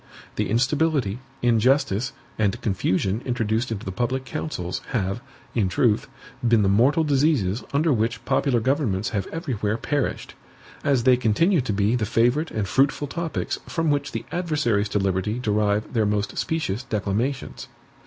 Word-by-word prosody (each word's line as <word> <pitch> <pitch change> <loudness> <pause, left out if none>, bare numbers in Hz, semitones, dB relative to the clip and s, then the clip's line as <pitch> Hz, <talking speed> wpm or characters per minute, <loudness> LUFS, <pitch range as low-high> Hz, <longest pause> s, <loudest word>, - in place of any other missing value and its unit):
The - - -1
instability, 135 -2 +1 0.2
injustice, 120 0 +2 0.3
and 105 -2 +1
confusion 95 +1 0
introduced 115 -1 -1
into 105 -3 -4
the 95 - -3
public 125 +6 -1
councils, 130 - -4
have, 100 -2 -2 0.3
in 105 -6 +1
truth, 110 +8 +2 0.4
been 115 -3 +4
the 95 - +3
mortal 130 +11 +4
diseases 135 - +1
under 150 +2 +2
which 115 0 -1
popular 135 -2 +2
governments 115 -6 0
have 100 -4 -2
everywhere 115 -10 -2
perished; 145 +1 -2 0.5
as 135 -4 +2
they 125 0 +5
continue 135 - +3
to 120 - -2
be 105 +3 +2
the 110 -4 -1
favorite 120 +8 +2
and 105 -3 -2
fruitful 140 +4 +2
topics 165 +3 -3
from 165 -2 0
which 140 -1 -1
the 115 0 -4
adversaries 145 - 0
to 105 - 0
liberty 95 +2 0
derive 105 -2 0
their 110 -3 +2
most 105 0 -1
specious 145 -10 -1
declamations. 115 +5 -2
120 Hz, 150 wpm, -24 LUFS, 105-140 Hz, 0.5 s, they